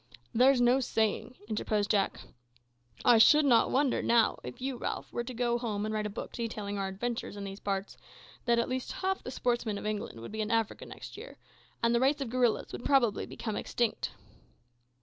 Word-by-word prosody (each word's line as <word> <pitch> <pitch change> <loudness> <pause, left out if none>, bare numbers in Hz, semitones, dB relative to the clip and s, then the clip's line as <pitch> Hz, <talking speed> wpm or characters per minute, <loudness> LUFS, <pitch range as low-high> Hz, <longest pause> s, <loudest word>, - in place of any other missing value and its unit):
"There's 255 +3 +5
no 245 +2 +5
saying," 225 0 0
interposed 210 -1 0
Jack. 200 -3 +1 0.8
"I 240 -2 +7
should 300 +6 +7
not 240 -4 +5
wonder, 270 -1 +2
now, 235 -2 +3
if 245 - -8
you, 260 +1 -2
Ralph, - - -4
were 240 - -1
to 250 - -6
go 240 0 +1
home 215 -3 -2
and 215 - -2
write 215 -1 -1
a - - -5
book 205 - -6
detailing 210 -3 -4
our 195 - -1
adventures 215 +2 -4
in 200 - -5
these 195 0 -6
parts, 195 0 -3 0.5
that 235 -1 +3
at 235 - +1
least 255 0 -3
half 380 0 -1
the - - -7
sportsmen 240 -4 -1
of - - -7
England 210 - -3
would 115 - -8
be 220 0 -3
in 215 - -2
Africa 225 -2 0
next - - -10
year, - - -10 0.5
and 230 0 +4
the 235 - +3
race 275 +4 +3
of 265 -5 -4
gorillas 245 -3 +1
would - - -7
probably 245 -7 +2
become 220 -3 -5
extinct." 235 -2 -1
235 Hz, 200 wpm, -30 LUFS, 210-250 Hz, 0.8 s, I